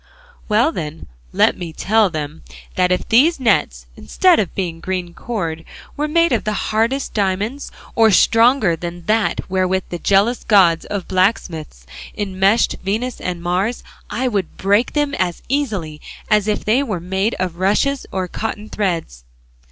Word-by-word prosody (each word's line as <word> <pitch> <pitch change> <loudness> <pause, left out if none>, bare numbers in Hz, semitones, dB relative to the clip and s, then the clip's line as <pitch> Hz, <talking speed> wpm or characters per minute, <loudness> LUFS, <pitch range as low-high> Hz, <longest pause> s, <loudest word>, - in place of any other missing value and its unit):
Well 225 +9 +3
then 155 - -6 0.3
let - - +3
me 170 -2 -5
tell 215 +5 +2
them 155 -1 -5 0.3
that 180 0 +1
if 180 - 0
these 280 +8 +4
nets, 130 - +1
instead 355 - +3
of 195 - -2
being 170 -4 -3
green 180 -1 -4
cord, 170 -8 -4 0.3
were 300 +1 -1
made 335 +1 +2
of 235 -4 +1
the 215 - -1 0.2
hardest 230 +5 0
diamonds, 205 +7 -2 0.2
or 225 -1 +5
stronger 230 -1 +4
than 175 +1 -7
that 220 0 0
wherewith 185 0 0
the 175 - -5
jealous 205 +7 +2
god 180 -6 +4
of 200 -3 -4
blacksmiths 175 - -1 0.3
enmeshed 195 +2 +1
Venus 220 +6 -2
and 175 -2 -4
Mars, 185 +7 -1 0.3
I 245 +5 -1
would 200 -7 -2
break 205 +5 +2
them 295 -1 0
as 180 -8 -2
easily 200 - -2 0.3
as 210 -1 +3
if 210 - -1
they 230 +6 +3
were 215 -10 -3
made 190 +5 -1
of 180 -2 -3
rushes 210 +9 +1
or 185 -1 -2
cotton 215 +2 -5
threads." 165 - -3
195 Hz, 155 wpm, -19 LUFS, 175-230 Hz, 0.3 s, or